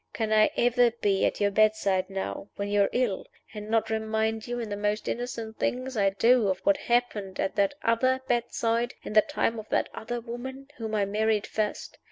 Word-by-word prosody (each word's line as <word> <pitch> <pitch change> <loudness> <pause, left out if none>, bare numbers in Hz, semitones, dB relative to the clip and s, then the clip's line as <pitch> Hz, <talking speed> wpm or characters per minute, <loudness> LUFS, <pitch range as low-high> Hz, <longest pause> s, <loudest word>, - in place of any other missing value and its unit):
Can 220 -1 -1
I 215 0 +5
ever 245 0 +4
be 205 -4 +1
at - - -3
your 205 0 +2
bedside 200 -3 +2
now, 195 +1 -5
when 200 0 -3
you 205 0 +3
are 200 - +3
ill, 240 -6 -1 0.3
and 210 0 -7
not 225 0 +1
remind 220 0 -1
you, 245 0 -3
in 230 -2 -4
the 205 - -2
most 210 +1 -1
innocent 230 -2 -4
things 255 +1 -2
I 200 -2 +3
do, 230 +3 +3
of 190 - +1
what 300 0 +3
happened 230 -6 -1
at 195 - 0
that 200 +6 +2
other 255 +3 +2
bedside, 235 0 0
in - - -6
the 215 - +7
time 225 +2 -1
of 215 - -10
that - - +1
other 240 +2 -4
woman 260 +4 -7
whom 220 -2 -3
I 205 -2 +2
married 215 +1 +1
first? 215 -1 -3
220 Hz, 205 wpm, -27 LUFS, 205-240 Hz, 0.3 s, the